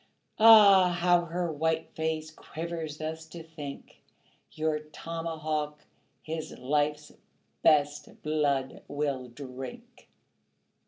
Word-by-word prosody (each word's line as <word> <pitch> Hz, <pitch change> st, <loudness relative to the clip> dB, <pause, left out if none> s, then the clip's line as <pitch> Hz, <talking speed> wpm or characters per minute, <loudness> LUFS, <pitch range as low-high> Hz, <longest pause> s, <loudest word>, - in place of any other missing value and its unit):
Ah, 200 Hz, -5 st, +8 dB
how 175 Hz, 0 st, +3 dB
her 170 Hz, 0 st, -2 dB
white 160 Hz, +1 st, -1 dB
face 160 Hz, 0 st, -2 dB
quivers 160 Hz, -1 st, -6 dB
thus 160 Hz, +1 st, -5 dB
to 165 Hz, +1 st, -9 dB
think, 155 Hz, -3 st, -10 dB, 0.5 s
Your 155 Hz, -1 st, -1 dB
tomahawk 155 Hz, -1 st, -4 dB, 0.4 s
his 160 Hz, 0 st, -5 dB
life's 150 Hz, +3 st, -1 dB, 0.5 s
best 145 Hz, -1 st, +2 dB
blood 145 Hz, -3 st, 0 dB
will 140 Hz, -3 st, -2 dB
drink. 130 Hz, 0 st, -10 dB
155 Hz, 95 wpm, -29 LUFS, 150-165 Hz, 0.5 s, Ah